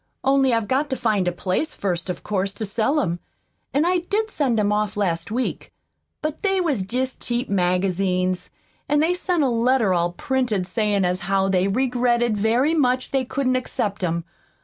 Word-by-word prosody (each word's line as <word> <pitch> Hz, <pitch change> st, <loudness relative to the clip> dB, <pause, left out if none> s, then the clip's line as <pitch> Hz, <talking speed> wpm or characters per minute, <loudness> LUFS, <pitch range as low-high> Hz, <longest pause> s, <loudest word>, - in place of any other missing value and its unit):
Only 270 Hz, -1 st, +3 dB
I've 230 Hz, -2 st, +1 dB
got 270 Hz, +5 st, +1 dB
to 265 Hz, -, -1 dB
find 215 Hz, -7 st, +1 dB
a -, -, +2 dB
place, 185 Hz, -, -2 dB
first, 180 Hz, -2 st, -2 dB
of 180 Hz, -, -4 dB
course, 195 Hz, -1 st, -1 dB
to 220 Hz, -, -3 dB
sell 225 Hz, +9 st, +1 dB
'em. 175 Hz, -6 st, -2 dB, 0.5 s
An' 290 Hz, +4 st, +2 dB
I 360 Hz, +1 st, +3 dB
did 420 Hz, +5 st, -1 dB
send 255 Hz, -7 st, +1 dB
'em 205 Hz, 0 st, +2 dB
off 210 Hz, 0 st, 0 dB
last 170 Hz, -5 st, -1 dB
week. 245 Hz, +4 st, -3 dB, 0.5 s
But 305 Hz, 0 st, -3 dB
they 390 Hz, -2 st, +1 dB
was 300 Hz, -, +1 dB
jest 255 Hz, +5 st, -2 dB
cheap 240 Hz, +2 st, -2 dB
magazines; 185 Hz, 0 st, 0 dB, 0.4 s
an' 295 Hz, -, +3 dB
they 325 Hz, +4 st, +3 dB
sent 360 Hz, -3 st, 0 dB
a -, -, +3 dB
letter 235 Hz, -3 st, +2 dB
all 175 Hz, 0 st, +1 dB
printed 240 Hz, -5 st, -1 dB
sayin' 205 Hz, 0 st, +1 dB
as 180 Hz, +1 st, 0 dB
how 195 Hz, 0 st, +2 dB
they 185 Hz, 0 st, +2 dB
regretted 240 Hz, 0 st, +1 dB
very 235 Hz, +9 st, +2 dB
much 255 Hz, -5 st, +1 dB
they 270 Hz, -1 st, +1 dB
couldn't 255 Hz, 0 st, 0 dB
accept 210 Hz, -6 st, -2 dB
'em. 170 Hz, -1 st, 0 dB
230 Hz, 185 wpm, -23 LUFS, 195-265 Hz, 0.5 s, Only